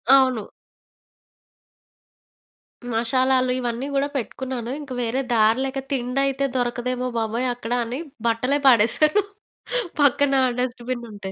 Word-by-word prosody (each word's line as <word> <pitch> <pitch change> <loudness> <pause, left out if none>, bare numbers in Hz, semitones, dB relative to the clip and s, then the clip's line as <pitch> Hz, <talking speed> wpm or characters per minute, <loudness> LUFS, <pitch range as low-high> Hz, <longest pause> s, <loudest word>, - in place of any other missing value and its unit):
అవును. 260 -5 +3 2.5
మషాలాలు 255 +3 +2
ఇవన్నీ 245 +2 -3
గూడా 275 +1 +2
పెట్టుకున్నాను. 255 -1 -4
ఇంక 285 -3 -10
వేరే 240 +3 0
దారి 220 +1 +4
లేక, 270 0 -3
తిండి 250 0 -1
అయితే 275 0 0
దొరకదేమో 250 0 -1
బాబోయ్ 230 +3 -1
అక్కడ 240 -1 -8
అని 245 +4 -4 0.3
బట్టలే 250 +5 +1
పడేశాను, 265 - +5 0.8
పక్కన 285 0 +4 0.3
డస్ట్‌బిన్నుంటే. 240 -5 -4
250 Hz, 100 wpm, -23 LUFS, 235-265 Hz, 2.5 s, పడేశాను